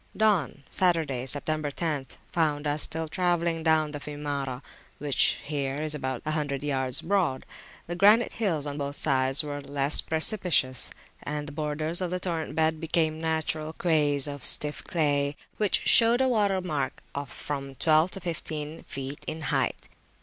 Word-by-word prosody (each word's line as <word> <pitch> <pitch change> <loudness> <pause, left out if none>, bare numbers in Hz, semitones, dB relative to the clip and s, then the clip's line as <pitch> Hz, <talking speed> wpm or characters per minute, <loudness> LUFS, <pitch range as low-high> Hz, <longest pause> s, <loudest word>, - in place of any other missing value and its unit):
Dawn 190 -10 +1
(Saturday, 155 -8 +1
Sept. 145 +2 -1 0.3
10th) 150 -6 -2 0.2
found 155 -3 0
us 145 +1 0
still 160 0 -2
travelling 170 -1 0
down 160 -2 +2
the 145 - -5
Fiumara, 145 -3 -4 0.3
which 145 -2 +3
here 140 -2 -2
is 155 +1 -3
about 130 -4 -4
a 155 - -1
hundred 145 -3 -1
yards 130 -3 +3
broad. 180 -8 0 0.4
The 175 - -4
granite 210 +5 +5
hills 170 -10 -1
on 145 0 -4
both 140 0 -3
sides 135 0 +2
were 145 -1 -5
less 140 +1 +1
precipitous; 160 - +2 0.3
and 150 0 -4
the - - -7
borders 155 +3 -1
of 180 - -1
the 180 +1 -2
torrent 170 -3 -3
bed 160 0 +1
became 160 -1 0
natural 160 -1 -1
quays 150 -5 +1
of 145 -1 -6
stiff 150 0 +3
clay, 145 -3 0 0.2
which 210 -2 +2
showed 235 +1 +6
a 260 - +3
water 205 -6 +2
mark 150 -7 -3
of 140 -2 -5
from 140 +1 -5
twelve 155 +4 +3
to - - -4
fifteen 160 -3 -5
feet 135 +1 -6
in 160 - -4
height. - - -1
150 Hz, 160 wpm, -27 LUFS, 145-165 Hz, 0.4 s, showed